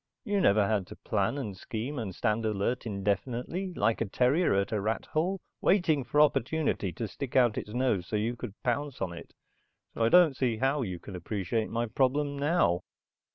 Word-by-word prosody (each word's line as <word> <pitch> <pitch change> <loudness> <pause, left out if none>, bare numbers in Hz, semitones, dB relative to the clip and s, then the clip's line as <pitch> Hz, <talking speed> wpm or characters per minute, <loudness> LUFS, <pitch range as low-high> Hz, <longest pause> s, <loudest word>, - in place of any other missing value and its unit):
You 205 -4 0
never 100 - +4
had 100 -4 0
to - - -10
plan, 100 +5 -1
and 110 -9 -4
scheme, 120 +8 -5
and 100 -6 -5
stand 110 -1 0
alert 110 +3 -1
indefinitely 120 - -2
like 110 +2 +1
a - - +2
terrier 130 - +2
at 100 0 0
a 105 -2 0
rat 110 +3 -1
hole 180 +5 0 0.2
waiting 170 -7 +3
for 145 - 0
opportunity 150 - +2
to 110 +6 -4
stick 135 +4 -7
out 120 -4 +4
its - - -4
nose 125 -9 +1
so - - -3
you 110 +3 0
could 105 -4 -7
pounce 140 +2 -1
on 90 -2 -2
it. 85 - -11 0.6
So 115 - -1
I 115 - +4
don't 175 -4 +6
see 125 -4 0
how 135 +4 +1
you 95 -7 -3
can 95 +2 -10
appreciate 100 +4 -2
my 115 +1 -1
problem 140 +5 +1
now." 140 - +2
115 Hz, 195 wpm, -29 LUFS, 105-145 Hz, 0.6 s, don't